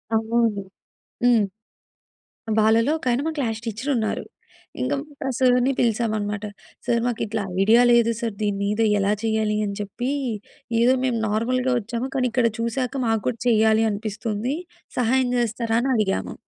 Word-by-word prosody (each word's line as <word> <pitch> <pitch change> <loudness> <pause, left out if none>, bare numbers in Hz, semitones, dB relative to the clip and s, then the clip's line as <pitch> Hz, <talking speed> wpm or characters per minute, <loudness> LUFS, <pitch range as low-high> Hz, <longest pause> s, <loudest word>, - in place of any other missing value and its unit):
అవును. 225 -2 +1 0.6
హ్మ్. 240 -4 +5 1.1
వాళ్ళలో 225 +4 +4
ఒకాయన 250 -4 0
మా - - +1
క్లాస్ 225 -5 -1
టీచర్ 230 +5 -3
ఉన్నారు. 220 -2 -1 0.6
ఇంకా 280 +3 0 0.3
ఆ - - 0
సార్‌ని 250 0 +3
పిలిచామనమాట. 215 -3 0 0.4
"సార్, 235 -1 +2
మాకిట్లా 225 -3 -2 0.2
ఐడియా 225 +4 +6
లేదు 235 -1 +4
సార్. 230 -3 -2
దీని 205 -1 0
మీద 210 +2 0 0.2
ఎలా 200 +1 +2
చేయాలి?" 220 -1 0
అని 200 - -3
చెప్పి, 240 +6 -3 0.7
"ఏదో 245 +2 +5
మేము 245 -3 +1
నార్మల్‌గా 250 +4 0
ఒచ్చాము 235 +4 -4
కానీ 255 -1 +2
ఇక్కడ 240 -1 +3
చూసాక 250 +3 -2
మాకు 225 -2 +1
కూడా 235 -3 -3
చెయ్యాలి 220 -1 +4
అనిపిస్తుంది. 215 +3 -3 0.4
సహాయం 250 +1 +2
జేస్తారా?" 230 -1 0
అని 270 - 0
అడిగాము. 200 -3 -1
230 Hz, 140 wpm, -23 LUFS, 215-245 Hz, 1.1 s, ఐడియా